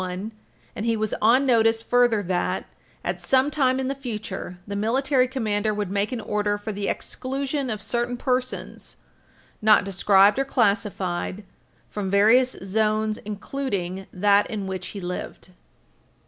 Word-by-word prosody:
1, 185 +4 -4 0.4
and 210 - -4
he 230 -1 +2
was 215 -1 -2
on 245 +5 +5
notice 225 -2 +3
further 240 -4 +3
that, 180 -1 -1 0.4
at - - -2
sometime 265 -1 +2
in 260 - -1
the 270 - -1
future, 215 -8 -6
the 200 - -5
Military 255 +5 +2
Commander 215 -5 -1
would 205 -3 -3
make 200 +3 0
an 250 - -3
order 210 -1 -1
for 205 +1 -5
the 200 -1 -3
exclusion 270 +1 -3
of 215 -2 -3
certain 240 +3 -1
persons, 255 0 -3 0.7
not 215 -2 +5
described 195 +3 +4
or - - +3
classified, 200 -5 0 0.4
from 200 -2 -4
various 225 +6 +4
zones 215 +2 0
including 200 -4 -4
that, 200 +2 +3
in 205 -3 -4
which 190 -1 -4
he 200 - -7
lived. 180 0 -6
215 Hz, 145 wpm, -24 LUFS, 200-250 Hz, 0.7 s, on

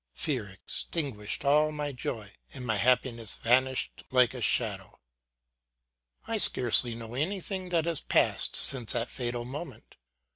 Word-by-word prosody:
Fear 125 -9 -2
extinguished 110 - -3
all 150 +2 +3
my 150 -1 -5
joy, 110 -5 -7 0.2
and 130 -2 -9
my 110 -3 -1
happiness 120 0 0
vanished 130 +2 0
like 125 -4 +2
a - - -8
shadow. - - -2 1.3
I - - -3
scarce 120 -1 +6
know 115 -1 -8
anything 185 +5 -4
that 165 -2 0
has 170 -3 -1
passed - - 0
since 125 -6 +6
that 115 +1 -3
fatal 120 -1 -3
moment. 140 +3 -10
125 Hz, 135 wpm, -28 LUFS, 115-150 Hz, 1.3 s, scarce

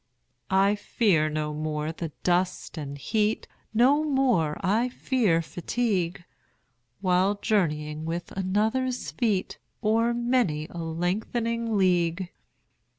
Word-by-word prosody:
I 195 +1 +4
fear 200 -6 +2
no 150 0 -2
more 155 0 -2
the 165 -1 -5
dust 180 +1 0
and 145 -3 -6
heat, 215 +8 0 0.3
25 - - -20
No 270 +6 +5
more 255 - +2
I 215 +6 +2
fear 220 -10 +1
fatigue, 180 0 -1 0.8
While 185 +1 +3
journeying 155 -8 0
with 170 +1 -4
another's 220 +7 0
feet 210 -6 -1 0.2
O'er 225 +2 +3
many 235 -11 +1
a 170 - -7
lengthening 220 +7 -1
league. 180 -1 +1
190 Hz, 110 wpm, -26 LUFS, 165-230 Hz, 0.8 s, No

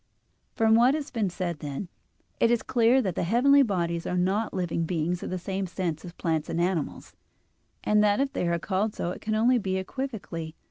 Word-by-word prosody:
From 225 -2 +3
what 245 +5 +5
has 300 -2 -5
been 220 -6 0
said, 175 -3 -4
then, 145 +6 -5 0.5
it 230 - +4
is 240 -1 +2
clear 245 +1 +3
that 190 -4 -1
the - - -2
heavenly 255 +10 +5
bodies 170 -8 -1
are 180 - -1
not 195 +5 +1
living 170 -2 -1
beings 170 +1 -1
in - - -5
the 185 - -2
same 190 +1 -3
sense 170 -3 -3
as 175 - -8
plants 160 -3 -2
and 165 0 -2
animals, 175 -3 -2 0.7
and 210 0 +3
that 205 -1 +3
if 275 0 0
they 175 - -1
are 170 0 +1
called 200 +4 -1
so, 175 - -2
it - - -8
can 215 0 -1
only 240 +3 +4
be 190 -2 -1
equivocally. 190 - -5
190 Hz, 205 wpm, -27 LUFS, 170-225 Hz, 0.7 s, what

